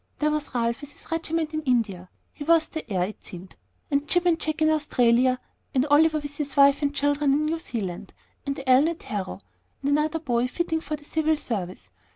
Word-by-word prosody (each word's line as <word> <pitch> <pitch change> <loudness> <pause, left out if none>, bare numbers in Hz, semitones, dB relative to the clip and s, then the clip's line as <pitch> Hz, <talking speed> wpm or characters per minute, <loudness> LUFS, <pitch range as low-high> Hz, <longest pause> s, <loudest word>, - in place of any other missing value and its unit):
There 300 0 +1
was 300 -3 -3
Ralph 235 +2 0
with 290 0 -9
his - - -16
regiment 325 -1 -1
in 310 - -1
India, 220 - 0 0.2
he 290 - -7
was 325 +1 +4
the 315 -8 -7
heir, 185 -2 +1
it 215 - -12
seemed, 180 0 -11 0.4
and 285 +1 +1
Jim 355 +2 +1
and 335 -2 +3
Jack 310 -1 -2
in 310 - +4
Australia, 255 -4 +3 0.4
and 260 +1 +3
Oliver 310 +1 +5
with 290 -1 -6
his 285 -2 -4
wife 280 +1 +6
and 285 -1 +1
children 290 0 +1
in 300 +2 +1
New 325 +2 -1
Zealand, 195 - -5 0.3
and 275 -1 -4
Allen 260 +4 +6
at 335 -1 -4
Harrow, 200 -2 -5 0.4
and 280 - +1
another 300 +2 +1
boy 250 -6 0
fitting 320 +3 -2
for 305 0 -3
the 295 0 -15
civil 315 0 +1
service. 180 - -4
290 Hz, 205 wpm, -25 LUFS, 245-310 Hz, 0.4 s, wife